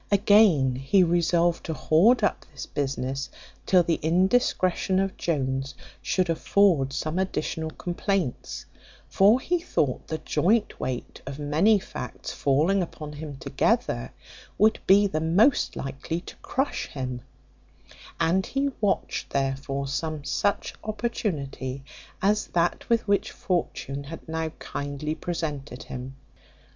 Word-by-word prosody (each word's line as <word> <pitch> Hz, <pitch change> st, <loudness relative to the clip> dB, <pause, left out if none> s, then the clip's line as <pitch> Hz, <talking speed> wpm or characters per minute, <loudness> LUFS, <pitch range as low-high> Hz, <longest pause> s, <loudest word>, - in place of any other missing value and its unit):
Again, 195 Hz, -, +5 dB
he 135 Hz, +9 st, +3 dB
resolved 170 Hz, 0 st, +2 dB
to 160 Hz, -, -2 dB
hoard 210 Hz, +13 st, +4 dB
up 205 Hz, -, +1 dB
this 135 Hz, -3 st, -7 dB
business, 135 Hz, -1 st, -3 dB, 0.4 s
till 180 Hz, -2 st, +5 dB
the 165 Hz, -1 st, 0 dB
indiscretion 185 Hz, +2 st, +2 dB
of 195 Hz, 0 st, -1 dB
Jones 135 Hz, -4 st, -2 dB, 0.3 s
should 185 Hz, -1 st, +1 dB
afford 165 Hz, -4 st, +3 dB
some 155 Hz, +6 st, -2 dB
additional 160 Hz, -3 st, -2 dB
complaints; 175 Hz, -, -3 dB, 0.4 s
for 205 Hz, +6 st, +5 dB
he 350 Hz, +6 st, 0 dB
thought 145 Hz, -, -1 dB
the 160 Hz, -, -2 dB
joint 205 Hz, +10 st, +1 dB
weight 130 Hz, -1 st, -4 dB
of 135 Hz, 0 st, -5 dB
many 155 Hz, +9 st, +3 dB
facts 70 Hz, -, -7 dB
falling 155 Hz, +8 st, +2 dB
upon 155 Hz, -3 st, -6 dB
him 145 Hz, -2 st, -7 dB
together, -, -, 0 dB, 0.5 s
would 215 Hz, +1 st, +4 dB
be 200 Hz, +2 st, +7 dB
the 155 Hz, -6 st, -1 dB
most 195 Hz, -, +3 dB
likely 135 Hz, +5 st, -4 dB
to -, -, -11 dB
crush 270 Hz, +2 st, -2 dB
him; 130 Hz, -3 st, -5 dB, 1.0 s
and 170 Hz, +3 st, +2 dB
he 275 Hz, +1 st, 0 dB
watched, 205 Hz, -2 st, 0 dB
therefore, 135 Hz, 0 st, -2 dB
some 155 Hz, +2 st, -3 dB
such 200 Hz, +8 st, 0 dB
opportunity 155 Hz, -, -3 dB, 0.4 s
as 210 Hz, +2 st, +2 dB
that 170 Hz, 0 st, 0 dB
with 230 Hz, -2 st, +2 dB
which 200 Hz, 0 st, +2 dB
fortune 140 Hz, -6 st, -3 dB
had 165 Hz, +4 st, -9 dB
now 160 Hz, 0 st, -2 dB
kindly 145 Hz, +2 st, -4 dB
presented 150 Hz, -7 st, -4 dB
him. 130 Hz, +1 st, -7 dB
160 Hz, 125 wpm, -26 LUFS, 140-195 Hz, 1.0 s, be